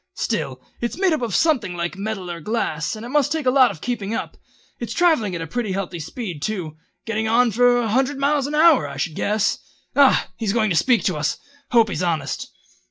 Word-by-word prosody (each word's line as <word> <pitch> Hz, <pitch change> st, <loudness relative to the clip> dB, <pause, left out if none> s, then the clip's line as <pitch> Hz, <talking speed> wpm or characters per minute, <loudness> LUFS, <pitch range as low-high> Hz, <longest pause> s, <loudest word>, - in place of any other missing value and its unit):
Still -, -, -3 dB, 0.2 s
it's 235 Hz, +5 st, -3 dB
made 375 Hz, -2 st, +2 dB
of 240 Hz, -, -1 dB
something 240 Hz, -, +1 dB
like 170 Hz, +1 st, -3 dB
metal 195 Hz, -2 st, -4 dB
and 170 Hz, -2 st, -7 dB
glass, 185 Hz, -6 st, -2 dB
and 215 Hz, +2 st, -8 dB
it -, -, -7 dB
must 285 Hz, +1 st, +2 dB
take 315 Hz, -2 st, -1 dB
a 255 Hz, -, +4 dB
lot 260 Hz, -2 st, +5 dB
of 155 Hz, -, -8 dB
keeping 225 Hz, -3 st, -3 dB
up. -, -, -5 dB, 0.4 s
It's 235 Hz, -, -5 dB
travelling 310 Hz, -, +2 dB
at 165 Hz, -, -4 dB
a -, -, -5 dB
pretty 215 Hz, +3 st, -3 dB
healthy 185 Hz, -3 st, -4 dB
speed 175 Hz, -, -6 dB
too. 180 Hz, -6 st, -3 dB, 0.3 s
Getting 220 Hz, -1 st, -1 dB
on 235 Hz, +1 st, +3 dB
for 245 Hz, +2 st, +4 dB
a 240 Hz, -2 st, 0 dB
hundred 265 Hz, +5 st, +1 dB
miles 280 Hz, 0 st, +1 dB
an 295 Hz, -, -3 dB
hour, 315 Hz, -2 st, +5 dB
I -, -, -8 dB
should 165 Hz, -, -2 dB
guess. 210 Hz, +5 st, 0 dB, 0.4 s
Ah! 280 Hz, -2 st, +4 dB
he's 220 Hz, -4 st, -1 dB
going 215 Hz, -3 st, +1 dB
to -, -, +1 dB
speak 240 Hz, +6 st, +3 dB
us! 150 Hz, -5 st, -1 dB, 0.3 s
Hope 230 Hz, -3 st, +4 dB
he's 190 Hz, -, -3 dB
honest." 165 Hz, -5 st, -2 dB
225 Hz, 215 wpm, -22 LUFS, 185-260 Hz, 0.4 s, lot